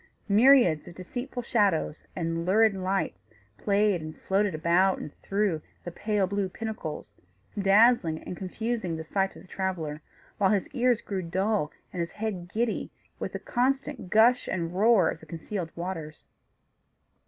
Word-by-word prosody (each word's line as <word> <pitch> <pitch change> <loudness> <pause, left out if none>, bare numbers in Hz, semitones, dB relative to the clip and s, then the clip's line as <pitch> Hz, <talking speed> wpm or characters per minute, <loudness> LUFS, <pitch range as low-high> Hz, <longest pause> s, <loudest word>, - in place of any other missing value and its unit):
Myriads 215 - +5
of 170 - -10
deceitful 245 +7 -5
shadows, 200 - +1
and 165 -1 -2
lurid 215 +4 +4
lights, 190 - -1 0.4
played 200 -3 +2
and 155 0 -8
floated 195 -2 0
about 175 +4 +3
and 150 - -7
through 195 -5 0 0.2
the 175 - -6
pale 205 +2 0
blue 200 0 -1
pinnacles, 180 - -6 0.4
dazzling 200 -4 +4
and - - -6
confusing 195 -1 -3
the 160 - -5
sight 195 +4 -1
of - - -12
the - - -17
traveller; 170 -6 -3 0.4
while 195 -2 +4
his 200 -2 +1
ears 245 -2 +2
grew 195 -2 -3
dull 185 -1 0 0.2
and 180 - -5
his 170 0 -3
head 200 -5 -4
giddy 230 +1 -1 0.3
with - - -4
the - - -2
constant 270 -3 -1
gush 230 +5 +4
and 170 -2 -2
roar 200 -2 +4
of 160 - -2
the 160 - -15
concealed 165 +2 -5
waters. 165 -4 -6
190 Hz, 155 wpm, -28 LUFS, 170-215 Hz, 0.4 s, Myriads